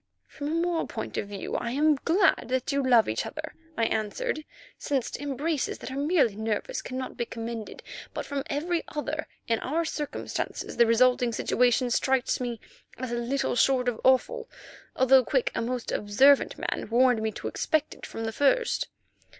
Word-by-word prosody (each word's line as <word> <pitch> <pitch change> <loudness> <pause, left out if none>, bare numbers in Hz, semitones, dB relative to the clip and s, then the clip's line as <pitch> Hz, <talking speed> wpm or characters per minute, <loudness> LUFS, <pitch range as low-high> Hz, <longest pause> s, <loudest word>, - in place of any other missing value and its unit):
"From 285 - -7
a 310 - -1
moral 340 0 0
point - - -5
of - - -2
view 200 -1 -6
I 235 - -1
am 305 +3 +4
glad 340 +7 +2
that 255 +3 -1
you 280 0 +1
love 245 -4 +5
each 110 - -1
other," 310 +1 -6 0.2
I 230 - +1
remarked, 225 - -1 0.4
"since 275 -5 -1
embraces 290 +2 -2
that - - -8
are - - -5
merely 285 - +2
nervous 220 0 -2
cannot 255 0 -5
be 240 - -1
commended. 230 -1 -6 0.3
But - - -5
from 280 -1 -2
every 330 +4 -1
other, 305 +1 -3 0.2
in 230 -1 +1
our 325 +5 -1
circumstances 300 -2 -4
the 235 -1 +6
resulting 245 +1 +4
situation 245 +2 +2
strikes 265 +1 +1
me 240 -3 -3 0.4
as 255 -1 -4
little 240 +4 -1
short 255 0 +3
of 240 -3 -1
awful, 460 - +2 0.5
although 260 0 +6
Quick, - - +1
a - - -1
most 245 +1 -3
observant 265 +7 +4
man, - - -3
warned 245 0 +4
me 220 0 0
to - - -5
expect 310 -1 0
it - - -10
from 225 - -6
the 225 - -2
first." 285 - +2
260 Hz, 175 wpm, -27 LUFS, 235-300 Hz, 0.5 s, the